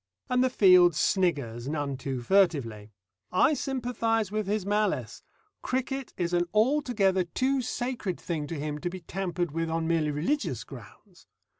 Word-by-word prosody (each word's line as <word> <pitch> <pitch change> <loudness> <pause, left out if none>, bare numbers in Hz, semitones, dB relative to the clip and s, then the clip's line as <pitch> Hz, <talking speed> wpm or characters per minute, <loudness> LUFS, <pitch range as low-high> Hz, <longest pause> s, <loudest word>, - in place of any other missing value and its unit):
And 250 0 +3
the 260 - +3
field 180 -7 +6
sniggers 145 - 0
none 145 -2 -2
too 130 -1 -4
furtively. 130 - +1 0.4
I 185 +11 +4
sympathise 235 -6 -1
with 215 -1 -2
his 205 -1 -1
malice. 210 +1 -1 0.4
Cricket 265 +1 -3
is 175 0 -1
an 175 0 +2
altogether 215 -6 +2
too 260 +10 0
sacred 240 -6 -3
thing 155 -4 -3
to 160 -1 -5
him 150 0 -3
to 175 - -3
be 185 +1 -8
tampered 175 -1 -3
with 165 +1 -2
on 165 0 -1
merely 165 -2 +1
religious 150 - -1
grounds. 135 - -14
180 Hz, 150 wpm, -28 LUFS, 150-225 Hz, 0.4 s, field